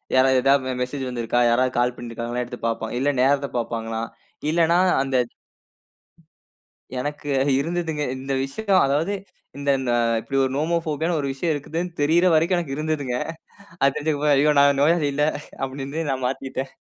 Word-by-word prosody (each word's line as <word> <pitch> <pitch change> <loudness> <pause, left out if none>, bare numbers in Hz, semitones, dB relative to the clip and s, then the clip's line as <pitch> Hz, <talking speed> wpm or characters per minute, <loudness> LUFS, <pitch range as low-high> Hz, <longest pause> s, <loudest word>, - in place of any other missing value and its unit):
யாராவது 130 0 +5
ஏதாவது 130 -2 +2
மெசேஜ் 130 0 -4
வந்திருக்கா? 120 0 0
யாராவது 125 +2 +2
கால் 125 0 +1
பண்ணியிருக்காங்களா 120 +1 -4
எடுத்து 125 0 -8
பார்ப்பாங்க. 115 0 -3
இல்ல 145 - +2
நேரத்த 140 0 +2
பாப்பாங்களா? 115 -1 -3 0.5
இல்லனா 170 +1 +3 0.2
அந்த 135 -1 0 1.8
எனக்கு 145 +1 -4 0.3
இருந்ததுங்க. 160 -1 -2 0.2
இந்த 135 +1 -3
விஷயம் 195 +6 +1
அதாவது 155 +8 0 0.4
இந்தந்த 135 -3 0 0.3
இப்படி 135 +3 -3
ஒரு 130 - 0
நோமோபோபியானு 160 +1 0
ஒரு 140 - -2
விஷயம் 160 +4 -1
இருக்குதுனு 165 +5 -4
தெரியற 165 +5 +4
வரைக்கும் 170 +4 +3
எனக்கு 135 -5 -4
இருந்ததுங்க. 150 -5 -1 0.7
அது 140 0 +4
தெரிஞ்சு 155 +1 0 0.2
ஐயோ 150 +2 +4
நான் 140 -1 +4
நோயாளி 155 -1 +3
இல்ல 150 +1 +2 0.4
அப்படின்னு 135 +3 -5
நான் 130 -1 -2
மாத்திட்டேன். 135 0 -4
140 Hz, 140 wpm, -23 LUFS, 130-155 Hz, 1.8 s, யாராவது